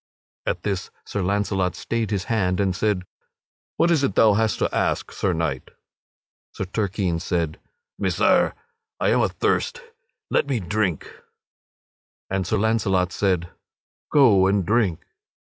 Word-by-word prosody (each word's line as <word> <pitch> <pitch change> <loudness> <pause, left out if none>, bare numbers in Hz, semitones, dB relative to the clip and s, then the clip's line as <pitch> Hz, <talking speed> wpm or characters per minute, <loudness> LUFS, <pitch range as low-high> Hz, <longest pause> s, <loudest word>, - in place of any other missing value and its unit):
At - - -1
this 95 -3 -2 0.2
Sir 100 - -3
Launcelot 95 -1 0
stayed 115 -3 -2
his 100 -3 -1
hand 95 -5 0
and 95 -2 +1
said: 100 -2 0 0.7
"What 170 - +3
is 155 -4 +3
it 135 - 0
thou 110 -2 +6
hast 110 +1 +1
to - - -1
ask, - - 0
Sir 95 - -1
Knight?" 80 -6 -2 0.8
Sir 95 - -4
Turquine 95 -3 -1
said: 85 -2 -2 0.4
"Messire, - - +2 0.4
I - - +2
am - - +3
athirst 485 0 0 0.5
let - - +2
me 135 -4 0
drink." 95 -3 -2 1.1
And 95 -2 -1
Sir 110 - +1
Launcelot 100 -4 +1
said: 90 -4 0 0.6
"Go 110 -10 +6
and 100 -1 +1
drink." 105 -5 +1
100 Hz, 135 wpm, -23 LUFS, 90-110 Hz, 1.1 s, thou